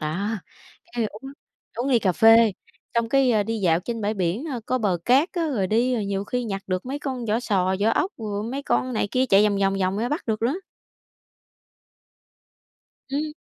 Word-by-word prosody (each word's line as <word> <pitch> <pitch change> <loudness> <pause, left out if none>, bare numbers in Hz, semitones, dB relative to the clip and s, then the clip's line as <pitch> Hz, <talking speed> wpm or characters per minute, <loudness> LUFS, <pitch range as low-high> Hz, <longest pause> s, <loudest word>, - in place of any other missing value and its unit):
Đó, 170 +7 -2 0.6
cái 235 - -1
uống 270 +7 -10 0.4
uống 245 +4 -1
ly 245 -3 +4
cà 190 -4 +1
phê, 225 +2 +6 0.4
xong 235 -1 +1
cái, 270 0 +3
a, 215 -2 +3
đi 225 +2 -3
dạo 170 -4 +2
trên 230 +4 -4
bãi 210 +1 -1
biển, 190 - -1
ơ, 255 -6 -4
có 255 - 0
bờ 195 -6 0
cát 275 +8 +4
á, 335 -4 -1
rồi 205 -9 0
đi 240 +5 +2
rồi 220 -4 -1
nhiều 200 0 -2
khi 250 +3 -2
nhặt 195 -3 -4
được 185 +3 -2
mấy 275 +3 -3
con 260 -4 -4
vỏ 220 +2 +1
sò, 190 -5 +1
vỏ 215 +2 +3
ốc, 385 - 0
rồi 210 -2 -3
mấy 280 - -3
con 255 -2 0
này 215 - 0
kia 255 +1 +1
chạy 200 -3 +5
vòng 200 - -1
vòng 195 0 +2
vòng 190 +2 0
ra 235 - -1
bắt 295 +5 -3
được 220 -1 -1
nữa. 270 +10 +1 2.5
Ừm. 295 +3 -2
225 Hz, 210 wpm, -24 LUFS, 200-255 Hz, 2.5 s, phê